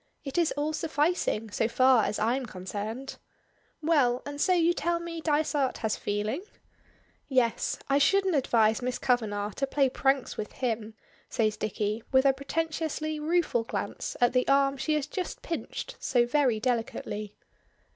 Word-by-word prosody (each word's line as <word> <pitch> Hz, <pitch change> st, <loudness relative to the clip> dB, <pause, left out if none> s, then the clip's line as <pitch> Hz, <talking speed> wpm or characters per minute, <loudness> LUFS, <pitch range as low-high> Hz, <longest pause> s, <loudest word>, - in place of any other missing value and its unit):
It 280 Hz, +4 st, -2 dB
is 335 Hz, -, +2 dB
all 300 Hz, +2 st, 0 dB
sufficing, 305 Hz, -, 0 dB
so 220 Hz, -, +1 dB
far 255 Hz, -1 st, +4 dB
as 210 Hz, -, -1 dB
I'm 240 Hz, +4 st, 0 dB
concerned. 215 Hz, +7 st, -6 dB, 0.7 s
Well; 275 Hz, -6 st, +3 dB
and 285 Hz, 0 st, -5 dB
so 375 Hz, -, +3 dB
you 345 Hz, -1 st, +4 dB
tell 345 Hz, -1 st, 0 dB
me 335 Hz, -1 st, -6 dB
Dysart 295 Hz, -3 st, +1 dB
has 215 Hz, -, +1 dB
feeling?" 210 Hz, -, -2 dB, 0.9 s
"Yes; 250 Hz, -4 st, +1 dB
I 275 Hz, +1 st, +3 dB
shouldn't 385 Hz, +4 st, +3 dB
advise 225 Hz, -4 st, +3 dB
Miss 250 Hz, 0 st, -2 dB
Kavanagh 215 Hz, -5 st, 0 dB
to 275 Hz, -, 0 dB
play 275 Hz, -1 st, +2 dB
pranks 270 Hz, 0 st, 0 dB
with 210 Hz, -, -5 dB
him," 225 Hz, -3 st, -3 dB, 0.3 s
says 215 Hz, -2 st, +1 dB
Dicky, 215 Hz, +1 st, -2 dB
with 265 Hz, 0 st, +4 dB
a 270 Hz, -, +6 dB
pretentiously 310 Hz, +2 st, -2 dB
rueful 310 Hz, -6 st, +1 dB
glance -, -, -4 dB
at 245 Hz, 0 st, +3 dB
the 250 Hz, 0 st, +2 dB
arm 275 Hz, 0 st, +4 dB
she 305 Hz, +3 st, 0 dB
has 300 Hz, -2 st, 0 dB
just 360 Hz, +5 st, -5 dB
pinched 480 Hz, +8 st, -5 dB
so 245 Hz, -2 st, +2 dB
very 250 Hz, -3 st, +2 dB
delicately. 225 Hz, -3 st, -2 dB
265 Hz, 155 wpm, -28 LUFS, 225-305 Hz, 0.9 s, a